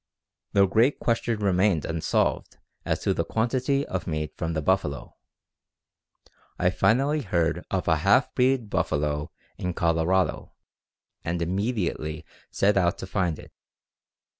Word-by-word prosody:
"The 100 -1 +5
great 115 +8 +3
question 115 -1 0
remained 95 -4 +2
unsolved 80 -1 -1 0.3
as - - -1
to - - +1
the - - -1
quantity 130 +5 0
of 95 -2 -4
meat 75 -2 -3
from 80 -1 -3
the 80 - -1
buffalo. 95 -6 -1 1.4
I 90 0 +2
finally 135 +10 +2
heard 85 - 0
of 95 -2 -2
a 80 -2 +3
half 100 - +3
breed 130 -2 +2
buffalo 75 -5 -1 0.3
in 90 -1 -3
Colorado, 85 +3 +1 0.7
and 85 +1 -2
immediately 85 -4 -2 0.2
set 100 +1 +2
out 90 -1 +2
to - - -6
find 90 -5 -1
it. - - -13
95 Hz, 130 wpm, -26 LUFS, 80-110 Hz, 1.4 s, The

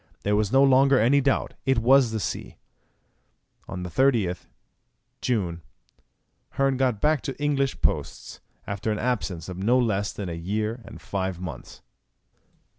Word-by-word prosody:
There 105 0 +1
was 105 -1 +1
no 135 +1 +5
longer 135 0 +5
any 135 +6 +4
doubt; 135 0 0
it 135 -1 +2
was 125 +2 +5
the 110 0 -3
sea! - - -5 1.1
On 90 -1 -6
the 90 - -5
30th 115 -9 +1 0.7
June 90 -9 -1 0.9
Hearn 135 -1 +1
got 125 -5 +1
back 150 +1 +2
to 135 - -4
the 145 - -9
English 140 -2 0
posts, - - -2 0.2
after 100 +2 -3
an 105 - -1
absence 105 -9 -2
of 90 -1 -7
no 115 +6 +3
less 105 -5 0
than 100 - -6
a 85 - -4
year 105 +7 -3
and - - -11
five 95 -2 -3
months. 80 -9 -8
110 Hz, 155 wpm, -25 LUFS, 95-135 Hz, 1.1 s, no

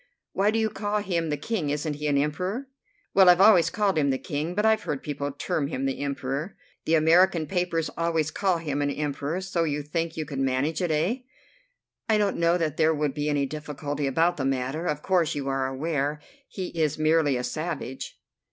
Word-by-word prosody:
"Why 200 +2 +2
do 220 - +1
you 220 -1 +1
call 205 0 -2
him 170 -5 -1
the 150 - -1
King? 175 -2 -2
Isn't 150 +1 -1
he 150 0 -3
an 145 -1 +2
Emperor?" 185 - -1 0.5
"Well, 190 -2 +7
I've 175 0 +6
always 190 -5 +6
called 195 -1 +1
him 140 -2 +2
the 135 - +1
King, 155 +6 -4
but 210 +1 +1
I've 220 0 +4
heard 140 -2 -4
people 145 -1 -3
term 145 +1 -2
him 135 -2 -3
the 135 - -2
Emperor." 140 +4 -3 0.3
"The 165 - +3
American 165 +1 +4
papers 175 -3 -1
always 165 -2 0
call 185 0 +1
him 145 -3 -2
an 145 - +1
Emperor. 145 +4 -2
So 185 -3 -1
you 150 -2 -1
think 165 +2 -3
you 155 - -2
could 140 -2 -5
manage 135 +5 0
it, 175 - 0
eh?" 160 +10 +1 0.9
"I 215 - +4
don't 205 -2 +1
know 170 +1 +3
that 155 -3 -2
there 160 0 +3
would 150 -2 -1
be 150 0 -2
any 145 -1 +1
difficulty 145 -1 -4
about 165 +6 +2
the 140 - -2
matter. 135 +5 -1
Of 150 0 -2
course 180 -6 +2
you 140 -2 -3
are 135 -1 0
aware 145 +1 -2 0.3
he 185 -2 -5
is 155 -3 0
merely 155 -3 +3
a 125 - -3
savage." 140 0 -5
155 Hz, 205 wpm, -26 LUFS, 145-175 Hz, 0.9 s, Well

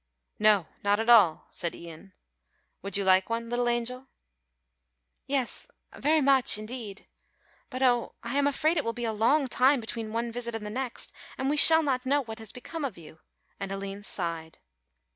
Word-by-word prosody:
"No, 210 -4 +4 0.2
not 205 +1 +2
at 225 +2 +2
all," 200 -9 +5
said 170 -2 -2
Ian. 170 +3 -12 0.7
"Would 200 0 -1
you 200 - -1
like 190 +1 +3
one, 230 0 -3
little 240 0 0
angel?" 245 +2 -2 1.2
"Yes, 270 -3 -2 0.3
very 310 +1 +2
much 270 -5 +4
indeed; 215 -2 -7 0.6
but 255 0 -3
oh, 245 -2 +1
I 235 +3 -4
am 285 0 +3
afraid 310 +4 +1
it 300 - +1
will 230 - -2
be 240 0 -4
a 225 - -1
long 255 +8 +2
time 260 +2 +3
between 225 -1 -6
one 230 +1 -2
visit 235 -1 -5
and 220 -2 -6
the 210 - -5
next, 255 +1 -4 0.2
and 265 +2 -1
we - - +1
shall 320 +2 +8
not 260 -4 -1
know 280 +2 +1
what 225 -1 -8
has 220 -1 -8
become 315 +5 -7
of 260 -8 -4
you," 160 -1 -14 0.4
and 195 -1 -5
Aline 195 0 -6
sighed. 165 -5 -5
235 Hz, 180 wpm, -27 LUFS, 205-265 Hz, 1.2 s, shall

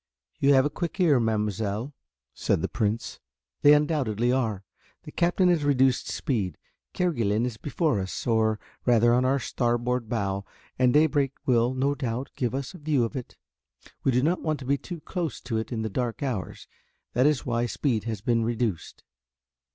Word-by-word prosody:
"You 140 0 +5
have 130 +1 +5
a 145 - 0
quick 170 +5 -4
ear, 155 -8 +4
mademoiselle," 110 +2 -1 0.4
said - - 0
the - - +1
Prince, 110 +2 -2 0.4
"they 145 +1 +8
undoubtedly 130 -7 +1
are. 110 -7 0 0.4
The - - -10
Captain 175 +2 +2
has 170 -4 +2
reduced 135 -3 +2
speed. 105 -9 -2 0.4
Kerguelen 115 - +1
is 120 -3 -4
before 145 - 0
us, 95 0 -4
or 110 -2 +2 0.3
rather 120 -1 +4
on 125 +1 +3
our 135 +2 +3
starboard 120 -1 -1
bow, 100 -4 -1 0.4
and 125 -1 +4
daybreak 145 -2 +3
will, 120 0 +2
no 135 +2 +1
doubt, 130 -2 -4
give 125 -1 -1
us 135 +3 -4
a 180 - -11
view 145 -4 +1
of 115 +5 -3
it. 130 -3 -7 0.7
We 135 - +3
do 125 +1 +2
not 170 +4 +1
want 155 -2 -1
to - - -7
be 140 +2 +1
too 170 +3 -8
close 170 -5 -4
to 115 -3 -3
it 110 - -5
in 110 -2 -2
the - - -1
dark 120 +4 -3
hours, 125 -9 -4 0.5
that 125 +4 +4
is 150 -3 +1
why 120 0 0
speed 115 -1 -1
has 110 -4 -3
been 115 0 +1
reduced." 115 -6 -2
125 Hz, 180 wpm, -26 LUFS, 115-145 Hz, 0.7 s, they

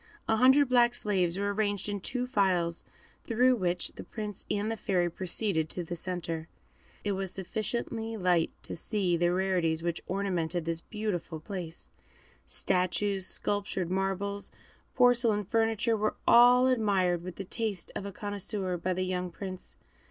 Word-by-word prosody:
A 220 - +3
hundred 265 +4 +6
black 240 -1 +4
slaves 185 -4 +1
were 200 0 0
arranged 205 -1 -1
in 205 -1 -2
two 250 +6 -2
files, 185 -8 +1 0.4
through 250 +3 +3
which 180 -5 -1
the - - -10
Prince 210 -2 -6
and 210 +2 0
the - - -1
Fairy 185 -5 0
proceeded 180 -2 0
to 180 - -2
the 175 +1 -5
centre. 170 -2 -3 0.6
It 205 - 0
was 195 -1 -2
sufficiently 225 +3 -3
light 180 -4 +2
to - - -3
see 185 0 0
the 175 +1 +2
rarities 180 -3 +1
which 170 -1 -2
ornamented 180 -3 -1
this 165 0 -2
beautiful 190 -7 -4
place; 170 -1 -6 0.6
statues, 190 +1 +1
sculptured 195 -3 -1
marbles, 195 +1 -2 0.5
porcelain, 240 -4 +4
furniture, 225 +2 +1
were 215 0 0
all 245 +1 +7
admired 200 -8 +2
with 180 0 -7
the 195 - -5
taste 210 -2 -2
of - - -3
a 200 - -5
connoisseur 200 -2 -3
by 180 +2 -1
the 185 - 0
young 180 -1 -2
Prince. 185 +1 -7
195 Hz, 150 wpm, -30 LUFS, 180-215 Hz, 0.6 s, all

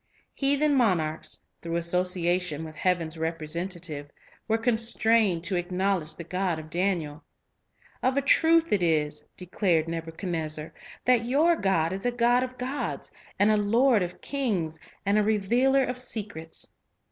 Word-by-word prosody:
Heathen 285 +2 +2
monarchs, 175 - 0 0.2
through 170 0 -4
association 175 -1 +1
with 155 -1 -9
Heaven's 170 -3 0
representative, 165 -1 -3 0.4
were 225 0 +2
constrained 225 -5 +2
to 185 +2 0
ac 175 - -2
Heaven's 180 0 -6
knowledge 190 -5 0
the 170 - -7
God 180 0 -1
of 155 0 -9
Daniel. 170 -4 -1 0.8
"Of 255 +2 +1
a 280 - +2
truth 330 +3 +4
it 200 - +2
is," 150 -3 +1
Amhassador, - - -29
declared 180 -3 0
Nebuchadnezzar, 165 -1 -4 0.3
"that 245 -2 +3
your 305 +7 +3
God 185 - +1
is 195 +5 -2
a - - +2
God 240 +1 +3
of 255 0 -6
gods, 260 +4 -3 0.3
and 205 +2 +4
a 215 - +3
Lord 225 +3 +3
of 180 0 -4
kings, 195 - -2 0.3
and 200 +2 +3
a - - +3
revealer 240 +6 +2
of 250 -1 -3
secrets." 205 -10 -4
185 Hz, 150 wpm, -27 LUFS, 165-235 Hz, 0.8 s, truth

